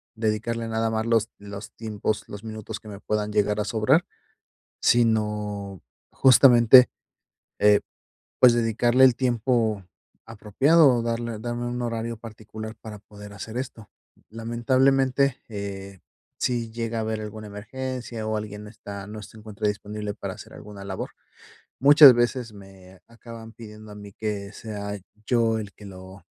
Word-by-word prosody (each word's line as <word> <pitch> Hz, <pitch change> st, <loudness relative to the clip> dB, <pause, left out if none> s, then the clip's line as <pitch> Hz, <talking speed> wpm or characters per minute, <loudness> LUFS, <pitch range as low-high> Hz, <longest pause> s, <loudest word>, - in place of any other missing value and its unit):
dedicarle 115 Hz, +1 st, -2 dB
nada 115 Hz, 0 st, 0 dB
más 110 Hz, 0 st, -1 dB
los 115 Hz, -1 st, +2 dB
los 100 Hz, 0 st, -9 dB
tiempos 110 Hz, -1 st, -4 dB
los 105 Hz, +1 st, -9 dB
minutos 110 Hz, -1 st, -7 dB
que -, -, -16 dB
me 100 Hz, -2 st, -9 dB
puedan 105 Hz, 0 st, -2 dB
llegar 105 Hz, 0 st, +1 dB
a 105 Hz, -, -1 dB
sobrar. 130 Hz, +11 st, +2 dB, 0.8 s
Sino, 105 Hz, -4 st, 0 dB, 0.3 s
justamente, 125 Hz, -1 st, +7 dB, 0.7 s
eh, 105 Hz, 0 st, +5 dB, 0.6 s
pues, 125 Hz, -2 st, +8 dB
dedicarle 120 Hz, +2 st, +3 dB
el 130 Hz, -3 st, +5 dB
tiempo 120 Hz, -4 st, 0 dB, 0.4 s
apropiado, 130 Hz, +9 st, +3 dB
o 115 Hz, -, -1 dB
darle 115 Hz, -1 st, -3 dB
darme 120 Hz, +1 st, -4 dB
un 120 Hz, 0 st, -3 dB
horario 115 Hz, -1 st, -3 dB
particular 110 Hz, 0 st, -9 dB
para 110 Hz, -2 st, -9 dB
poder 105 Hz, 0 st, -13 dB
hacer 110 Hz, +3 st, -8 dB
esto. 120 Hz, -5 st, -7 dB, 0.4 s
Lamentablemente, 130 Hz, +4 st, +1 dB
eh, 100 Hz, -3 st, -7 dB, 0.4 s
si 120 Hz, -2 st, -1 dB
llega 115 Hz, 0 st, -3 dB
a -, -, 0 dB
haber 110 Hz, 0 st, -3 dB
alguna 110 Hz, 0 st, -8 dB
emergencia, 120 Hz, +2 st, -6 dB
o 110 Hz, 0 st, -1 dB
alguien 105 Hz, 0 st, -6 dB
está 100 Hz, -2 st, -9 dB
no 105 Hz, 0 st, -8 dB
se 105 Hz, -, -13 dB
encuentra 105 Hz, -1 st, -3 dB
disponible 105 Hz, 0 st, -4 dB
para -, -, -6 dB
hacer -, -, -13 dB
alguna 100 Hz, -1 st, -11 dB
labor, 95 Hz, -1 st, -5 dB, 0.7 s
muchas 145 Hz, 0 st, +9 dB
veces 120 Hz, -1 st, -1 dB
me 95 Hz, -2 st, -15 dB
acaban 115 Hz, -1 st, -12 dB
pidiendo 110 Hz, -2 st, -12 dB
a -, -, -10 dB
mí 105 Hz, -1 st, -11 dB
que 105 Hz, -2 st, -4 dB
sea 105 Hz, -2 st, -6 dB, 0.3 s
yo 115 Hz, -2 st, +2 dB
el 100 Hz, -2 st, -8 dB
que 105 Hz, -, -14 dB
lo 95 Hz, -1 st, -12 dB
110 Hz, 145 wpm, -25 LUFS, 105-120 Hz, 0.8 s, muchas